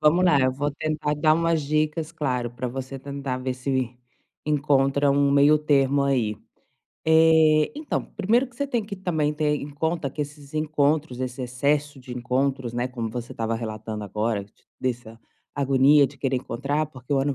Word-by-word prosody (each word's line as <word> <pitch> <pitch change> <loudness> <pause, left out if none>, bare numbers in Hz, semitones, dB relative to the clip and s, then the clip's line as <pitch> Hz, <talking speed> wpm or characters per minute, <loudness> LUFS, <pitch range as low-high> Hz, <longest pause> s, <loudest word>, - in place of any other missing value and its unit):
Vamos 170 +4 +4
lá, 150 -6 +5
eu 130 0 +2
vou 145 +2 -1
tentar 155 0 -2
dar 155 +1 +3
umas 165 -1 +1
dicas, 155 +2 -1
claro, 125 -7 -2
para 125 +1 -4
você 135 +1 -6
tentar 140 -1 -4
ver 130 0 -2
se 130 -2 -2 0.5
encontra 140 -1 +2
um 140 0 +3
meio-termo 140 -1 +4
aí. 120 -6 +1 0.7
Eh, 160 -1 +5
então, 300 -1 -2
primeiro 230 +6 +2
que 235 -1 -21
você 280 - -1
tem 240 -5 -1
que 205 -1 -7
também 155 -5 -1
ter 150 -1 +1
em 145 - -6
conta 160 +1 -2
que 150 +3 -3
esses 145 0 -11
encontros, 150 -3 0
esse 130 0 -4
excesso 140 +3 -1
de 125 -1 -8
encontros, 130 0 -1
né, 120 +1 -1
como 115 -3 -4
você 120 0 -6
estava 115 0 -2
relatando 110 -1 -5
agora, 105 +1 -2
t - - -28 0.3
dessa 120 -3 -4 0.3
agonia 140 +1 +5
de 140 +2 -12
querer 135 -1 -1
encontrar, 140 +5 -2
porque 130 -2 -8
o 135 - +3
ano 140 0 0
140 Hz, 175 wpm, -24 LUFS, 125-155 Hz, 0.7 s, lá